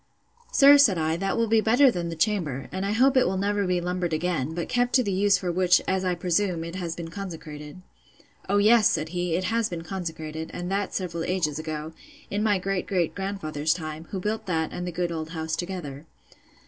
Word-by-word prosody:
Sir, 285 - +7
said 215 -10 +5
I, 160 0 0
that 195 +4 -1
will 230 - +2
be 225 0 +3
better 245 +5 +5
than 175 -5 -3
the 165 - -5
chamber, 160 - -1
and 190 +1 -2
I - - -1
hope 260 +5 +3
it 255 - +4
will 190 +1 -1
never 200 0 0
be 180 -1 +1
lumbered 180 -1 -2
again, 160 -3 -1
but 170 - -3
kept 245 0 0
to 255 - +4
the 200 - -2
use 200 +1 +3
for 180 -1 -2
which, 180 0 +4
as 190 0 0
I 180 -1 0
presume, 175 0 0
it 170 0 -7
has 175 -3 -4
been 170 -1 -6
consecrated. 160 -3 -8 0.7
O 200 - +3
yes, 215 +1 +5
said 155 +1 -1
he, 175 -1 -1
it 185 - -1
has 225 +3 0
been 170 -2 -5
consecrated, 160 -3 -5
and 175 +1 -4
that 200 0 -1
several 170 -3 -3
ages 165 -5 -1
ago, 155 0 -5 0.4
in 205 - -1
my 210 -2 +3
great 190 0 -2
great 180 -4 0
grandfather's 160 -6 -2
time, 155 -1 -6
who 195 - -4
built 215 +2 -3
that 160 -3 -1
and 180 - -4
the - - -3
good 175 0 -2
old 160 -1 -4
house 160 -1 -3
together. 165 -5 -6
180 Hz, 220 wpm, -26 LUFS, 160-200 Hz, 0.7 s, Sir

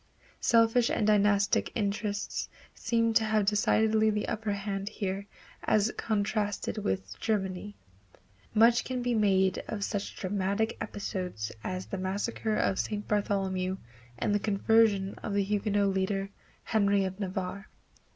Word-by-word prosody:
Selfish 230 +1 +4
and 215 - +1
dynastic 205 -1 +3
interests 205 -1 -2 0.2
seem 230 -1 +1
to 220 - +4
have 215 -1 +2
decidedly 215 +1 +3
the 210 -1 -1
upper 220 -1 -2
hand 200 0 -3
here 195 -1 -4 0.4
as 215 +1 +2
contrasted 210 0 -1
with 95 - -3
Germany. 200 -1 -2 0.8
Much 230 +2 +5
can 255 -1 -3
be 245 0 +1
made 190 -3 +3
of 205 -2 -3
such 205 -1 -3
dramatic 200 +3 -1
episodes 180 - -4
as 185 0 -3
the 195 - -5
massacre 205 +3 -2
of 190 - +1
St. 210 -1 -3
Bartholomew 190 -2 0 0.4
and 205 - 0
the 205 - +2
conversion 205 -1 +3
of 200 - -3
the 200 - +3
Huguenot 205 0 +1
leader, 195 +1 -1 0.3
Henry 200 -2 +2
of 190 +1 -5
Navarre. 190 +1 -4
205 Hz, 130 wpm, -29 LUFS, 195-215 Hz, 0.8 s, Much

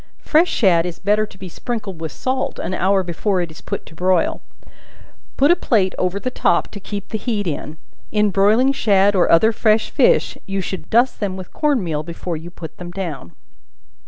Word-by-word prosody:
Fresh 330 +3 +3
shad 175 -7 +3
is 170 -1 -6
better 210 +2 +1
to 195 - -16
be 190 - -8
sprinkled 205 -2 -5
with 160 -2 -4
salt, 265 +1 -2
an - - -4
hour 190 +1 +2
before 185 +3 -1
it 170 -2 -3
is 160 - -13
put - - -5
to - - -14
broil; 180 +1 +1 1.0
put 285 +4 +5
a - - +6
plate 205 - +1
over 185 +2 0
the 255 - -3
top 170 - +1
to 205 - -8
keep 200 0 -6
the 220 - -3
heat 210 -2 -2
in. 155 -1 -4 0.3
In 210 -1 +2
broiling 215 +8 +4
shad 200 -5 +3
or 180 - +3
other 220 +7 +5
fresh 220 -1 +2
fish - - +2
you 195 0 -2
should 185 -2 -5
dust 240 +3 +3
them 195 -3 -2
with 185 -1 -9
corn 290 -8 +1
meal 155 -4 -2
before 170 +2 -5
you 160 +2 -7
put 170 -2 -10
them 175 -1 -7
down. 165 - -6
195 Hz, 200 wpm, -20 LUFS, 175-220 Hz, 1.0 s, a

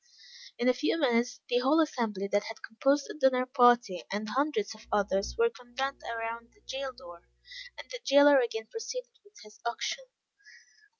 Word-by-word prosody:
In 245 - 0
a 255 - +6
few 300 +6 0
minutes 245 -3 +1
the 245 - +2
whole 275 +6 +3
assembly, 225 -10 0
that 205 +1 +1
had 225 - -9
composed 275 +5 +1
the - - -7
dinner 265 -3 +2
party, 245 -7 +4
and 210 +2 -3
hundreds 260 -4 0
of 215 - -17
others, 200 -1 0
were 465 0 +3
convened 265 - -5
around 230 0 -5
the 415 - -28
jail 270 -4 -5
door, 175 -10 -13 0.6
and - - -10
the - - -6
jailer 285 0 +7
again 225 -3 -2
proceeded 480 - -7
with 410 +1 -23
his 210 0 -17
auction. 370 - -3
250 Hz, 170 wpm, -30 LUFS, 225-285 Hz, 0.6 s, jailer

